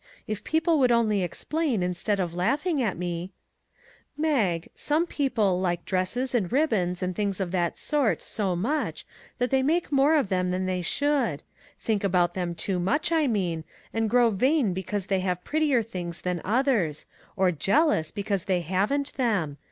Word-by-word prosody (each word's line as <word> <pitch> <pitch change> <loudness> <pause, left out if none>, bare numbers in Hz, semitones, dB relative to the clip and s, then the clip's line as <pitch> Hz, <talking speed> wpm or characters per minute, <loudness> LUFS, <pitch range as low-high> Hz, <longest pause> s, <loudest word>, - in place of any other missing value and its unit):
If 215 -2 -4
people 320 0 +2
would 250 -2 +4
only 220 -4 +2
explain, 250 - -1
instead 180 +3 -1
of 175 -3 -1
laughing 280 - 0
at 215 -8 -1
me 175 +1 -4 0.3
": - - -40
" - - -33
Mag, 190 - +1
some 310 +3 0
people 220 - 0
like 175 -2 -1
dresses, 205 +8 -1
and 210 -8 0
ribbons, 210 - +1
and 180 0 -2
things 200 -1 -1
of 185 -3 -2
that 175 -2 0
sort, 285 -7 0
so 195 -4 -1
much 265 - -2 0.3
that 250 +1 -1
they 265 0 +3
make 320 +6 0
more 285 +3 +4
of 280 -10 +1
them 180 -1 0
than 185 +1 -1
they 185 -1 -1
should; 255 - 0 0.4
think 215 -3 -1
about 180 -3 +2
them 175 -2 -3
too 185 +2 -1
much, 290 - 0
I 320 -3 +3
mean, 180 -8 -1 0.3
and 225 -1 0
grow 240 0 +4
vain 255 - +2
because 190 +1 -3
they 195 -1 0
have 180 -1 -2
prettier 295 -6 +1
things 175 -6 -5
than 180 -2 -2
others, 215 - +1 0.3
or 190 -2 +3
jealous 190 - +2
because 200 -3 -2
they 185 -2 +1
haven't 200 - 0
them. 200 - 0
200 Hz, 175 wpm, -26 LUFS, 180-270 Hz, 0.4 s, would